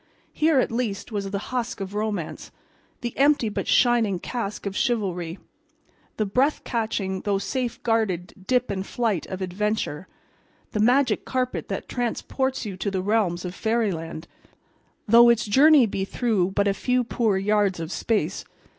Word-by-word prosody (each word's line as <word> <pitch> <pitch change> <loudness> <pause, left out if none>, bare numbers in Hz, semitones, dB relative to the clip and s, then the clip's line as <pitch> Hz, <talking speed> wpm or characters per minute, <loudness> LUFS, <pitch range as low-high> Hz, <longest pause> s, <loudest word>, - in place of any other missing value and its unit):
Here, 305 -2 +3
at - - +1
least, 230 -3 -3
was 200 -2 -3
the 200 - -2 0.2
husk 245 -1 -2
of 195 0 -5
Romance, 210 -5 -3 0.5
the 240 -1 -4
empty 280 -4 +3
but 205 - -4
shining 235 -6 +3
casque 210 +2 -5
of 200 0 -3
Chivalry, 190 -8 -1 0.8
the 215 - +1
breath 260 +9 +1
catching 205 -5 -2
though 205 -1 0
safe 235 +5 -3
guarded 215 -7 0
dip 250 -3 +1
and 190 -1 -2
flight 215 -4 -1
of 190 0 -4
Adventure, 185 -3 -2 0.6
the 210 - -2
magic 250 +5 +3
carpet 255 -1 -2
that - - -4
transports 260 +2 -2
you 200 -3 -5
to 200 - -2
the 190 -2 -2
realms 190 -4 +1
of 180 - -4
fairyland, 185 -8 -2 0.8
though 235 +2 +8
its 235 -2 +3
journey 275 +5 +6
be 195 -2 -2
through 200 -3 0
but 200 +1 +1
a 200 - +3
few 250 +5 +1
poor 225 -4 0
yards 200 -2 +1
of 165 +1 -5
space. 200 -6 -1
210 Hz, 155 wpm, -24 LUFS, 195-240 Hz, 0.8 s, though